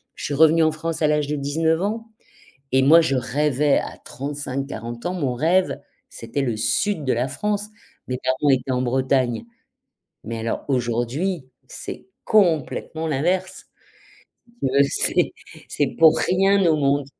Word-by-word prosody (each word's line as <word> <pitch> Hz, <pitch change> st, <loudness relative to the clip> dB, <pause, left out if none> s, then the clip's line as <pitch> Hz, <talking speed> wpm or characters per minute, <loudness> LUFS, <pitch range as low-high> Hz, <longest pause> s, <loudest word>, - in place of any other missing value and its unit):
Je -, -, -9 dB
suis 145 Hz, -, -3 dB
revenue 160 Hz, +2 st, +5 dB
en 155 Hz, -, +3 dB
France 165 Hz, +1 st, -4 dB
à 155 Hz, -, +4 dB
l'âge 150 Hz, -1 st, +1 dB
de 150 Hz, -, -2 dB
19 160 Hz, +4 st, 0 dB
ans 225 Hz, +3 st, -3 dB, 0.6 s
et 130 Hz, -, +4 dB
moi 150 Hz, +5 st, +7 dB
je 160 Hz, -4 st, 0 dB
rêvais 140 Hz, +3 st, +1 dB
à -, -, -4 dB
35-40 135 Hz, -4 st, -5 dB
ans, 180 Hz, -, -1 dB
mon 145 Hz, -9 st, -1 dB
rêve, 175 Hz, +8 st, +1 dB, 0.3 s
c'était 115 Hz, +5 st, -4 dB
le 120 Hz, -5 st, -1 dB
sud 145 Hz, -, 0 dB
de 130 Hz, -, +2 dB
la 120 Hz, +3 st, 0 dB
France. 205 Hz, +9 st, -2 dB, 0.4 s
Mes 125 Hz, -, -2 dB
parents 130 Hz, +3 st, +1 dB
étaient 130 Hz, -1 st, +2 dB
en 125 Hz, 0 st, 0 dB
Bretagne. 130 Hz, -, 0 dB, 0.8 s
Mais 115 Hz, 0 st, -5 dB
alors 115 Hz, +1 st, -3 dB
aujourd'hui, 130 Hz, +7 st, -1 dB, 0.2 s
c'est -, -, -8 dB, 0.2 s
complètement 165 Hz, -4 st, +1 dB
l'inverse. 180 Hz, +6 st, -1 dB, 1.0 s
Heu, -, -, +3 dB
c'est 140 Hz, -, +1 dB, 0.4 s
c'est 145 Hz, -, 0 dB
pour 160 Hz, -1 st, +6 dB
rien 195 Hz, +1 st, +3 dB
au 160 Hz, -2 st, +4 dB
monde 140 Hz, -1 st, +1 dB
145 Hz, 150 wpm, -22 LUFS, 130-165 Hz, 1.0 s, moi